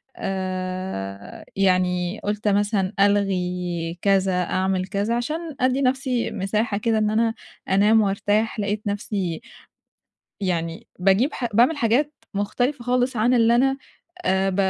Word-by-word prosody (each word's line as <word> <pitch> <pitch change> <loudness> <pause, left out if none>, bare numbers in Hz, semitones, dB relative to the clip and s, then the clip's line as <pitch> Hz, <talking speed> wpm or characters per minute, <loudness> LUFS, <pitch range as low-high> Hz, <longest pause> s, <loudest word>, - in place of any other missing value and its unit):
آآ 185 - -4
يعني 180 -1 +1
قُلت 210 +1 -2
مثلًا 205 -1 +1
ألغي 180 -4 0
كذا، 190 -2 +2
أعمل 185 0 -1
كذا، 205 +4 -1
عشان 310 +5 -3
أدّي 260 +2 +2
نفسي 255 -2 0
مساحة 205 +1 -1
كده 225 +1 +1
إن 215 -1 +2
أنا 225 +1 +1 0.4
أنام 210 +3 +5
وأرتاح، 205 +2 0
لقيت 205 +1 -2
نفسي 200 -4 -2 1.0
يعني 170 -4 -2
باجيب 195 +10 +3
ح 245 - -3
باعمل 255 +7 +4
حاجات 275 +5 +1 0.2
مختلفة 245 +6 -1
خالص 250 +1 +1
عن 235 +3 +2
اللي 235 -1 +4
أنا 270 +2 +2 0.5
آآ 190 +1 +2
ب 190 - -3
205 Hz, 125 wpm, -23 LUFS, 185-235 Hz, 1.0 s, أنام